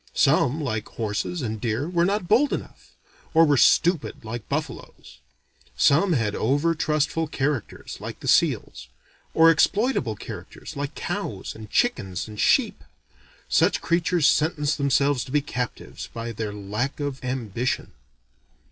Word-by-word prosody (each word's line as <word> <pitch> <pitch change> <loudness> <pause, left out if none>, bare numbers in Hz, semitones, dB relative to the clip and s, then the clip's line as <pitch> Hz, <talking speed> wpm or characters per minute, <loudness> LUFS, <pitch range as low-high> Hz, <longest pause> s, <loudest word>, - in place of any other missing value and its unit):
Some, 140 +6 +3
like 110 -7 -3
horses 115 +9 -3
and 110 -2 -4
deer, 120 +5 -1
were 170 -1 +1
not 195 -1 -1
bold 245 +9 +3
enough; - - -7 0.4
or 165 0 +7
were 145 -2 +3
stupid, 165 -1 +3
like 115 0 -6
buffaloes. - - -6 0.6
Some 170 +6 +4
had 115 -7 0
over 145 +10 +1
trustful 155 +1 0
characters, 145 -4 -3
like - - -7
the - - -8
seals; - - +1 0.5
or 165 0 +7
exploitable 180 - +1
characters, - - -9
like 145 +1 -4
cows, - - -4
and 110 -1 -11
chickens, 95 - 0
and 105 -1 -10
sheep. - - +2 0.6
Such - - +3
creatures 170 -1 +1
sentence 155 -1 +2
themselves 140 -1 +2
to 130 - -10
be 150 - +3
captives, 125 -4 -5
by 115 0 -5
their 110 -1 -4
lack 105 +8 -3
of 145 -2 -4
ambition. 125 -2 -2
140 Hz, 140 wpm, -24 LUFS, 115-165 Hz, 0.6 s, or